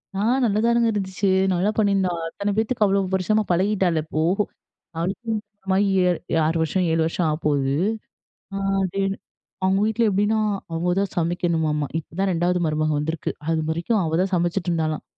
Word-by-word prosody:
ஆ, - - -2 0.2
நல்லாதானுங்க 230 +2 +2
இருந்துச்சு. 195 0 -1 0.2
நல்லா 185 +4 +1
பண்ணியிருந்தா. 200 -4 +2 0.2
அத்தன 200 +5 -3
பேத்துக்கு, 220 +1 +1
அவ்ளோ 200 0 +2
வருஷமா 200 +3 +2
பழகிட்டாள 185 -2 +2
இப்போ, 155 0 -2 0.8
அவளுக்கு 185 +8 -3
கல்யாணமாகி, 205 -2 -1 0.6
6 165 +2 +1
வருஷம், 180 +4 +1
7 165 0 +2
வருஷம் 165 +2 -1
ஆகப்போது. 145 -3 0 0.8
அ - - -2 0.3
அதே 190 +1 -2 0.6
அவங்க 190 +1 +3
வீட்ல 220 +2 +1
எப்டீன்னா, 205 +3 +1 0.3
அவங்க 175 +2 0
தான் 200 -1 -1
சமைக்கணுமாமா. 165 -3 0
இப்ப 155 - -13
தான் 195 0 +2
2வது 175 +1 +1
மருமக 155 0 0
வந்திருக்கு. 160 +2 -2 0.2
அது 165 -1 +1
வரைக்கும் 185 +7 0
அவ 160 - -2
தான் 190 +1 -1
சமச்சிட்ருந்தாளாம். 170 -3 -1
185 Hz, 140 wpm, -23 LUFS, 165-200 Hz, 0.8 s, அவங்க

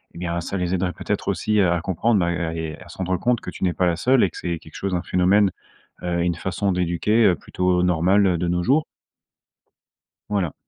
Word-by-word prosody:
eh - - -9
bien 85 0 -2
ça 95 - -4
les 90 0 -1
aiderait 90 -1 0
peut-être - - -3
aussi 105 -1 +1
à 85 -2 +3
à 85 - -2
comprendre, 95 +4 +1
bah, 85 - +1
à 85 -1 -2
et 80 -1 -4
à - - -14
se - - -12
rendre 95 -1 -1
compte 125 -1 +1
que 90 - -7
tu - - -8
n'es 90 -2 +2
pas 90 - +1
la 85 -1 +1
seule 125 +5 +3
et 95 - +1
que - - -11
c'est 85 -2 -3
quelque - - -16
chose, 95 -2 -2
un 85 - -2
phénomène, 95 +3 +3 0.5
heu, 85 -1 -1
une 85 -1 0
façon 95 +2 -1
d'éduquer, 90 +6 +2
heu, 90 - +5
plutôt 90 +3 0
normale, 90 +3 +3
heu, 90 -2 +1
de 90 - -1
nos 90 0 0
jours. 145 - +2 1.5
Voilà. 95 -6 -1
90 Hz, 235 wpm, -22 LUFS, 85-100 Hz, 1.5 s, heu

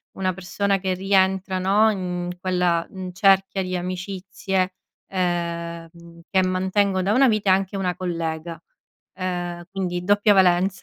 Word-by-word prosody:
una 185 -1 -1
persona 195 +2 -1
che 190 0 -1
rientra 190 0 +1
no, 205 +4 +4
in 180 -3 -3
quella, 180 -2 +1
mhmm, 185 -1 -7
cerchia 195 0 +3
di 185 0 -3
amicizie, 185 +1 -3 0.3
ehm, 170 -2 -4
che 190 -1 +3
mantengo 190 +1 +1
da 195 +3 0
una 270 +1 +5
vita, 210 -3 +1
è - - +7
anche 195 +1 -1
una 180 -3 -1
collega, 165 -2 -4 0.5
ehm, 175 -2 -4
quindi 180 -2 -3
doppia 205 +2 +4
valenza. 185 0 +3
185 Hz, 140 wpm, -23 LUFS, 175-195 Hz, 0.5 s, è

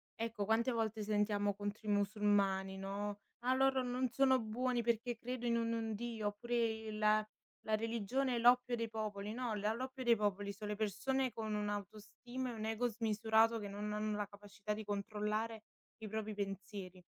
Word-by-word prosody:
ecco, 225 -2 -2
quante 230 +4 +3
volte 220 -2 -1
sentiamo 205 -1 +2
contro 205 +2 -5
i - - +2
musulmani, 200 -2 +2
no: 200 +1 -3 0.3
"Ah, 255 - +4
loro 265 0 +4
non 250 0 0
sono 260 +1 +4
buoni 240 +2 0
perché 235 +1 0
credono 240 -1 -1
in 230 0 0
un 225 -1 -1
Dio". 225 -1 -2
oppure 235 +4 -2
"Il 215 -1 +2 0.4
la 220 - +3
religione 235 +4 0
è - - +1
l'oppio 245 +1 +5
dei 230 -1 -2
popoli". 210 -1 -3
no, 245 -2 -2
l 205 - -3 0.2
l'oppio 260 +1 -4
dei 235 -1 +6
popoli 205 -1 0
son 205 +1 -7
le 210 - -1
persone 240 +5 0
con 220 -1 -3
un'autostima 210 +5 -4
e - - -4
un 220 -1 -4
ego 225 +2 +1
smisurato 225 0 +3
che 205 - -5
non 210 +1 -3
hanno 210 0 -1
la 205 - -1
capacità 205 +1 -6
di 215 - -5
controllare 210 +2 -2 0.4
i 215 - -3
propri 220 0 -3
pensieri. 195 -2 -5
215 Hz, 175 wpm, -37 LUFS, 205-235 Hz, 0.4 s, dei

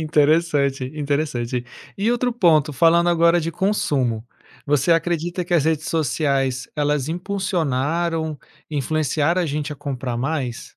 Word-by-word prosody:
interessante, 150 -3 +2
interessante. 140 -5 -2 0.3
E 210 +4 +1
outro 245 +1 0
ponto 160 - +3
falando 170 +5 +4
agora 170 0 +4
de 165 +1 -2
consumo. 145 - 0 0.4
Você 145 +3 +3
acredita 175 +2 -1
que 175 - -6
as 155 -4 +3
redes 160 -1 0
sociais 135 -4 0
elas 145 -1 0
impulsionaram, 165 -3 -1 0.3
influenciaram 155 +3 0
a - - -1
gente 150 -1 -3
a - - -9
comprar 130 -4 -4
mais? 130 -2 -3
155 Hz, 130 wpm, -21 LUFS, 140-170 Hz, 0.4 s, falando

